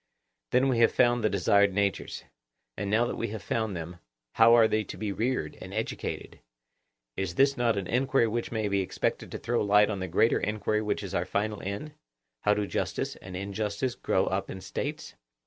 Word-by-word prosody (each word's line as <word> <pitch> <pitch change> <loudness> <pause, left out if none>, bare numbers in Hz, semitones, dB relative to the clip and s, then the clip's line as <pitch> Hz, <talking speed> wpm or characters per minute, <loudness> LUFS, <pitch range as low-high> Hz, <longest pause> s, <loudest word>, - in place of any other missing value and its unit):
Then 130 +2 +3
we 125 -3 +1
have 115 - +5
found 120 -1 +3
the 110 - +3
desired 100 0 +3
natures; 100 -1 -1 0.5
and 100 +1 -3
now 110 +3 +3
that - - -3
we 115 - -1
have 105 -1 -6
found 110 -4 -1
them, 85 +1 -6 0.4
how 115 +1 +7
are 115 -2 +6
they 110 0 +1
to - - -8
be 105 +1 -3
reared 115 -6 -2
and - - -8
educated? - - -4 0.8
Is 95 -3 -2 0.2
not 120 -3 +2
this 100 - 0
an - - -9
enquiry 130 +4 +2
which 115 +2 -3
may 110 -2 -1
be 100 -1 +1
expected 95 - -2
to - - -4
throw 120 0 -1
light 105 +1 +4
on 100 - -3
the 95 - -3
greater 95 +6 +3
enquiry 105 0 -1
which 105 -1 -2
is 95 -1 -6
our 85 -1 0
final 105 +2 -2
end—How - - -4
do 105 0 0
justice - - -2
and 90 -1 -8
injustice 105 +5 -2
grow - - 0
up - - -2
in 95 - -6
States? 150 +11 -5
105 Hz, 200 wpm, -28 LUFS, 100-115 Hz, 0.8 s, how